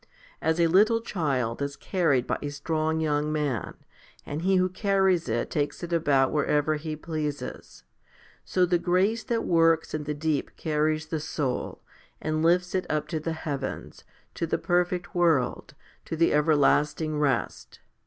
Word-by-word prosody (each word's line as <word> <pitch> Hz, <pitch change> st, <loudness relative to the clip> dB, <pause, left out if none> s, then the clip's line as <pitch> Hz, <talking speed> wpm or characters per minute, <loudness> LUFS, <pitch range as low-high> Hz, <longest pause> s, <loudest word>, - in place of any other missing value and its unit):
As 160 Hz, +1 st, +1 dB
a 170 Hz, -, +5 dB
little 210 Hz, +7 st, +4 dB
child 135 Hz, -, -2 dB
is 140 Hz, 0 st, -2 dB
carried 155 Hz, -10 st, +1 dB
by -, -, -2 dB
a 145 Hz, -, -3 dB
strong 155 Hz, +2 st, -1 dB
young 150 Hz, -1 st, 0 dB
man, 145 Hz, -7 st, -2 dB, 0.5 s
and 145 Hz, +2 st, -4 dB
he 190 Hz, +2 st, +2 dB
who 185 Hz, 0 st, +3 dB
carries 190 Hz, -, +1 dB
it 115 Hz, +1 st, -1 dB
takes 145 Hz, +3 st, -2 dB
it 170 Hz, 0 st, -4 dB
about 140 Hz, -5 st, +3 dB
wherever 150 Hz, 0 st, +1 dB
he 155 Hz, 0 st, -4 dB
pleases, 155 Hz, -2 st, -5 dB, 0.6 s
so 185 Hz, -1 st, +2 dB
the 175 Hz, -1 st, +1 dB
grace 185 Hz, +6 st, +1 dB
that 230 Hz, -1 st, -1 dB
works 165 Hz, -1 st, +3 dB
in 155 Hz, -1 st, -3 dB
the 150 Hz, 0 st, -3 dB
deep 150 Hz, -1 st, -2 dB
carries 155 Hz, 0 st, 0 dB
the 160 Hz, -, -2 dB
soul, 145 Hz, -4 st, -3 dB, 0.4 s
and 155 Hz, 0 st, -1 dB
lifts 180 Hz, +2 st, +2 dB
it 185 Hz, -1 st, -1 dB
up 155 Hz, -1 st, -1 dB
to 160 Hz, -, -2 dB
the 160 Hz, +1 st, -3 dB
heavens, 140 Hz, -4 st, -5 dB, 0.3 s
to 165 Hz, -, -3 dB
the -, -, 0 dB
perfect 180 Hz, +1 st, 0 dB
world, 165 Hz, -8 st, +1 dB, 0.3 s
to -, -, -4 dB
the 165 Hz, +1 st, +3 dB
everlasting 150 Hz, 0 st, +2 dB
rest. 135 Hz, -5 st, -1 dB
155 Hz, 160 wpm, -26 LUFS, 150-175 Hz, 0.6 s, a